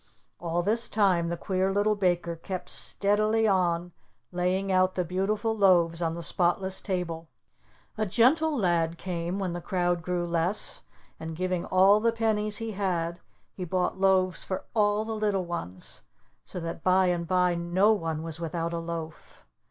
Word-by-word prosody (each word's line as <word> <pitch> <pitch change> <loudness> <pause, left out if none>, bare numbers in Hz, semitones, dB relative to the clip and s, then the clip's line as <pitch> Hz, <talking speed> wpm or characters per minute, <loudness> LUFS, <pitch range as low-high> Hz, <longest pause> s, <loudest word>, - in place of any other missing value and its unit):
All 175 +1 -1
this 230 +4 0
time 185 -5 +2
the 170 - -3
Queer 190 +1 0
Little 205 +2 +2
Baker 175 -4 0
kept 180 +2 -6
steadily 215 +2 +1
on 175 -3 +1 0.4
laying 185 +2 0
out 185 0 +3
the 180 - 0
beautiful 205 +5 -1
loaves 175 -5 +3
on 165 -1 -1
the 170 - -6
spotless 185 +3 0
table. 170 -4 -3 0.7
A 215 - +1
Gentle 285 - +3
Lad 170 -5 +1
came, 175 0 -3
when 190 -3 -2
the 175 - -5
crowd 175 -1 0
grew 175 +1 -2
less, 170 +4 -2 0.4
and 160 0 -6
giving 185 0 -2
all 195 +3 +5
the 230 +1 +2
pennies 215 -2 0
he 225 -1 -4
had 175 -4 -2 0.3
he 185 - -6
bought 180 +1 -1
loaves 190 -2 +2
for 190 - -4
all 210 -1 +2
the 225 - -3
little 205 -4 0
ones; 95 - -6 0.4
so 180 - -7
that 165 -1 -6
by 185 0 +4
and 175 -2 0
by 180 0 +2
no 175 +5 +2
one 165 -5 -3
was 165 0 -4
without 165 0 -3
a 170 - -2
loaf. 165 -1 -7
185 Hz, 165 wpm, -27 LUFS, 170-200 Hz, 0.7 s, all